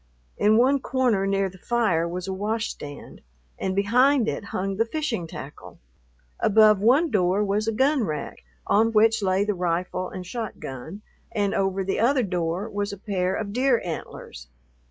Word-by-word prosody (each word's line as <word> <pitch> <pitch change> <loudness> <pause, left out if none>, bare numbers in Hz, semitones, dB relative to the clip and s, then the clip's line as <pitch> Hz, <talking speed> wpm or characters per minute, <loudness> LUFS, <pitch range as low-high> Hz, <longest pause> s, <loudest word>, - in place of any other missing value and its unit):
In 215 +1 +3
one 265 +4 +4
corner 250 -7 +1
near 195 0 +1
the 190 0 -12
fire 185 -8 +1
was 180 +2 -5
a 190 - -2
washstand, 205 -8 -5 0.4
and 190 0 -2
behind 245 +5 +3
it - - -3
hung 195 0 -3
the 225 - +2
fishing 240 - -3
tackle. 145 -2 -10 0.6
Above 215 -1 +5
one 275 +9 +4
door 190 -1 +2
was 210 +2 -1
a - - +2
gun 265 +4 +2
rack, 155 -7 -5 0.2
on 225 +2 +2
which 220 +1 +4
lay 190 +1 +1
the 210 - 0
rifle 180 0 -2
and 185 -1 -7
shotgun, 185 - -7 0.3
and 205 -3 0
over 195 0 0
the 195 +1 -2
other 255 +3 +3
door 180 0 -2
was 205 -2 -3
a 200 - -7
pair 185 -2 -1
of 205 -2 -4
deer 255 0 +2
antlers. 155 - -7
205 Hz, 165 wpm, -24 LUFS, 185-225 Hz, 0.6 s, Above